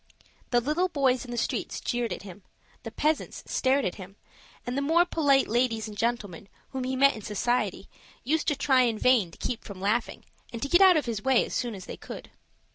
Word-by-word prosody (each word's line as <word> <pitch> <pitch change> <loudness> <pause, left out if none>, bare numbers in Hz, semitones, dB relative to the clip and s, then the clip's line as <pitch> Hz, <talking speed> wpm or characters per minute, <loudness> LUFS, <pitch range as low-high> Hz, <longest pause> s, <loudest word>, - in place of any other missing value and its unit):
The 240 - +3
little 305 +9 0
boys 265 -5 +1
in - - -12
the 240 - -4
streets - - -2
jeered 240 -2 -2
at - - -5
him, 200 0 -11 0.4
the - - -7
peasants 305 0 -1
stared 265 +1 +1
at 185 +2 -4
him, 185 +1 -11 0.5
and 245 +2 -3
the 280 - 0
more 325 +5 +3
polite 285 -6 +2
ladies 230 -1 0
and 210 - -9
gentlemen 205 -5 -2 0.2
whom 260 -1 -4
he 260 +1 -2
met 275 +1 +5
in 220 - -8
society 240 +5 -1 0.4
used 310 +4 0
to 295 - +2
try 270 -2 +3
in 235 -3 +1
vain 235 -7 +3
to - - -16
keep 240 - -4
from 200 -3 -9
laughing, 210 +5 -1 0.3
and 230 - -6
to - - -1
get 345 +5 +5
out 375 -3 +7
of 305 - 0
his 225 -4 -3
way 265 0 +3
as - - -8
soon 240 -3 -2
as 185 - -9
they - - -8
could. - - -10
245 Hz, 220 wpm, -27 LUFS, 220-275 Hz, 0.5 s, out